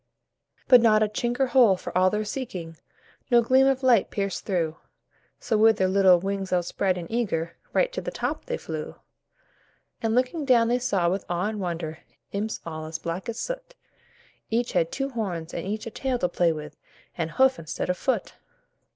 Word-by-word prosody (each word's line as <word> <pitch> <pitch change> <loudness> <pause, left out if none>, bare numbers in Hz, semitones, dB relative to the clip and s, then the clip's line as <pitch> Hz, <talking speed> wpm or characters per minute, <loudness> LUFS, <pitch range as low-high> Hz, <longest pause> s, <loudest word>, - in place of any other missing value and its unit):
But 250 -2 +8
not 215 -2 +5
a - - +2
chink 240 +4 -2
or 270 - +4
hole, 240 -6 +5
for - - -8
all 185 +1 +5
their 210 +2 -2
seeking, 185 -9 -5 0.5
No 240 -2 +5
gleam 260 +3 +4
of 270 0 +1
light 240 -6 +4
pierced 200 -1 -3
through, 165 -5 -1 0.6
So 220 - 0
with 220 0 +5
their 190 - +2
little 190 -2 +5
wings 195 +1 -3
outspread 180 +1 0
and 175 - -5
eager, 190 -8 -1 0.2
Right - - +1
to - - -3
the - - -4
top - - -3
they 485 - -3
flew. - - -6 1.1
And 225 0 0
looking 255 +6 +1
down 240 -4 +4
they 245 +1 +2
saw 200 -8 +1
with 185 +3 -1
awe 175 +4 0
and 215 -1 -5
wonder. 165 -4 -4 0.3
Imps 210 +2 -3
all 155 -1 -6
as 160 0 -4
black 170 +7 -5
as 230 - -4
soot; - - -5 0.7
Each 235 +2 0
had 165 -2 +1
two 270 0 -2
horns 185 -10 -4
and - - -4
each 215 +2 -3
a 230 - -6
tail 260 +2 -1
to 180 - 0
play 175 -2 +2
with, 150 -1 -7 0.4
And 165 -2 -2
hoof, 265 0 +3
instead 160 0 -4
of - - -2
foot. 260 +8 -1
210 Hz, 195 wpm, -25 LUFS, 175-245 Hz, 1.1 s, But